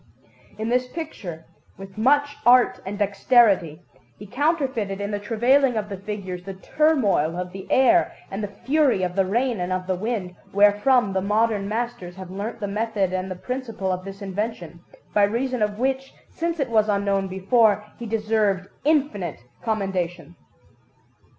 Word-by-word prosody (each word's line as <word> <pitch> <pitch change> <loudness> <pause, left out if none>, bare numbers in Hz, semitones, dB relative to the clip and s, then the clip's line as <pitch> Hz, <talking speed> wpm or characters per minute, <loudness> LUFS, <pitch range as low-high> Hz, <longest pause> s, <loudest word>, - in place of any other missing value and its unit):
In 220 +1 -3
this 250 +1 +1
picture, 210 - -7 0.3
with 195 0 -11
much 285 +6 +2
art 245 +1 +5
and 205 +1 -4
dexterity, 200 - +3 0.3
he 205 - -10
counterfeited 260 - -1
in 200 +1 -3
the 205 - -2
travailing 245 +5 +3
of 210 -1 -3
the 200 - -5
figures 190 -2 -6
the 195 +1 -7
turmoil 205 - +1
of 180 0 -4
the 190 +1 -9
air 335 +7 +4 0.2
and 195 +2 -4
the - - -1
fury 250 +1 +1
of 180 0 -2
the 195 -1 +2
rain 240 +2 0
and 180 +1 -2
of 185 0 -1
the 185 - 0
wind, 190 -2 -3 0.2
wherefrom 205 +2 +4
the 190 - 0
modern 210 0 +1
masters 220 -6 -4
have 185 -1 -9
learnt 210 +5 -5
the 205 - -3
method 205 -2 -1
and 185 0 -2
the 185 - -4
principle 225 -3 -4
of 185 0 -3
this 195 +1 -8
invention, 195 -3 -4 0.3
by 205 - +3
reason 240 +4 +1
of 210 -1 0
which, 265 +2 -2 0.2
since 335 0 -3
it 265 -4 -1
was 215 -1 +3
unknown 200 -1 +1
before, 210 +2 +2
he 235 - -5
deserved 210 -3 0
infinite 265 - 0 0.2
commendation. 180 -6 -2
205 Hz, 165 wpm, -23 LUFS, 190-240 Hz, 0.3 s, art